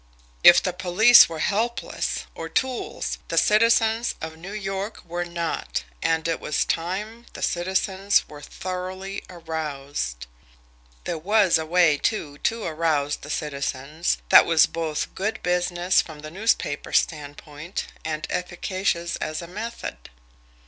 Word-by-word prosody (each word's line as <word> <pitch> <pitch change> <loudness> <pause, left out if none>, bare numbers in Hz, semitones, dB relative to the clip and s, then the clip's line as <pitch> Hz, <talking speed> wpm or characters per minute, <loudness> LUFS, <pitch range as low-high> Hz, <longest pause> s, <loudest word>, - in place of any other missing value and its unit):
If 175 - +9
the 185 - -1
police 190 +6 +7
were 165 - -5
helpless, 230 +4 -2
or 165 - -7
tools, 255 +8 -2
the - - -3
citizens 225 +1 +3
of 160 0 -6
New 175 +5 -9
York 200 0 -4
were 175 +1 -3
not, 170 - -3 0.2
and 160 0 +1
it 165 - -1
was 150 - 0
time 210 +8 -3
the - - -7
citizens 190 +2 +1
were 145 -1 -11
thoroughly 185 +3 -6
aroused. 145 - -4 0.8
There 165 - -3
was 195 0 +3
a 160 - -4
way, 165 -4 +4
too, 150 -10 -2
to 230 -1 -1
arouse 155 -3 0
the 145 - -11
citizens, 150 +2 -2
that - - +8
was 165 -2 +6
both 160 -2 -3
good 210 +4 -2
business 180 0 +2
from 155 -2 -11
the 155 0 -8
newspaper 190 -6 -1
standpoint, 150 +3 -2 0.2
and 155 -1 -3
efficacious 180 -1 -2
as 155 0 -3
a - - -8
method. 205 - -7
175 Hz, 135 wpm, -24 LUFS, 155-195 Hz, 0.8 s, If